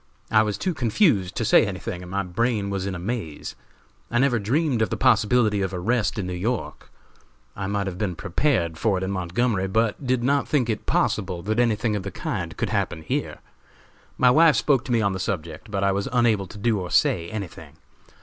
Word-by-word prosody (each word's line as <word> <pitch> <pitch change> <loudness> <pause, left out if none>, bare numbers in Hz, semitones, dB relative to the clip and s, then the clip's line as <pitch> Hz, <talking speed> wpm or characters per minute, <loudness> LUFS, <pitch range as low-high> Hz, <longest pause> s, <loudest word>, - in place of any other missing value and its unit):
I 110 - +6
was 105 -2 -1
too 185 - -1
confused 115 - +2
to - - -1
say - - +6
anything 90 - -4
and 90 - -10
my 100 +2 -1
brain 100 +2 -1
was 95 -1 -2
in 95 - -3
a - - -4
maze. 90 -5 -5 0.6
I 120 - 0
never 125 -2 +3
dreamed 130 +3 0
of 110 - +1
the - - -2
possibility 110 -3 +3
of 95 -1 -2
arrest 115 +5 0
in 100 - -2
New 90 - -4
York. 110 +7 -3 0.7
I 100 -1 -4
might 100 0 -1
have 95 -2 -5
been 95 -5 -1
prepared 85 - 0
for 105 -4 +1
it 90 - -3
in 95 - -2
Montgomery, 95 +2 0
but 110 +6 0
did 125 -1 +1
not 140 +2 +1
think 125 -6 +1
it 105 - -5
possible 90 -4 0
that 110 +3 -1
anything 110 -2 +1
of 100 - -2
the 100 - -5
kind - - -4
could - - -2
happen 80 - -1
here. - - -3 0.8
My 125 -1 +5
wife 155 +1 +6
spoke 130 +3 +2
to 130 - -4
me 115 -2 +3
on 100 -2 +1
the 95 - -4
subject, 85 +1 -4
but 100 -2 -2
I 100 - +3
was 100 +1 -1
unable 115 -5 +2
to 105 - -11
do 105 0 +1
or 90 -1 -5
say 85 -1 +2
anything. 100 -5 -7
105 Hz, 215 wpm, -24 LUFS, 95-120 Hz, 0.8 s, I